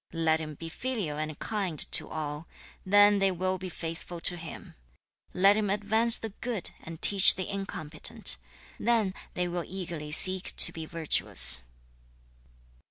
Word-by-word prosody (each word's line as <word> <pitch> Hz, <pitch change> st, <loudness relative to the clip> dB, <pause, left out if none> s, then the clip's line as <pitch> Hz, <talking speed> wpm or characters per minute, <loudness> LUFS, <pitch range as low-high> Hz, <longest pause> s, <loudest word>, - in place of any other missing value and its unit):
Let 160 Hz, -1 st, 0 dB
him 155 Hz, -1 st, -8 dB
be 165 Hz, -, -10 dB
filial 185 Hz, -6 st, -5 dB
and 155 Hz, -1 st, -6 dB
kind 195 Hz, -7 st, -5 dB
to -, -, +2 dB
all; 150 Hz, 0 st, -7 dB, 0.4 s
then 205 Hz, +1 st, +3 dB
they 195 Hz, 0 st, +2 dB
will 185 Hz, +1 st, -4 dB
be 185 Hz, 0 st, -7 dB
faithful 170 Hz, +1 st, -8 dB
to 175 Hz, -, 0 dB
him. 165 Hz, -2 st, -11 dB, 0.6 s
Let 195 Hz, +3 st, +3 dB
him 210 Hz, -2 st, -2 dB
advance 220 Hz, +3 st, +2 dB
the 225 Hz, -, -7 dB
good 235 Hz, -6 st, -3 dB
and 165 Hz, -1 st, -11 dB
teach 195 Hz, -2 st, +6 dB
the 185 Hz, -, -6 dB
incompetent; 155 Hz, -, -2 dB, 0.4 s
then 225 Hz, -4 st, -1 dB, 0.2 s
they 180 Hz, 0 st, -2 dB
will 175 Hz, 0 st, -5 dB
eagerly 170 Hz, -5 st, -8 dB
seek 185 Hz, +4 st, +4 dB
to -, -, +8 dB
be 160 Hz, -1 st, -9 dB
virtuous.' 165 Hz, -2 st, +4 dB
180 Hz, 150 wpm, -27 LUFS, 160-200 Hz, 0.6 s, to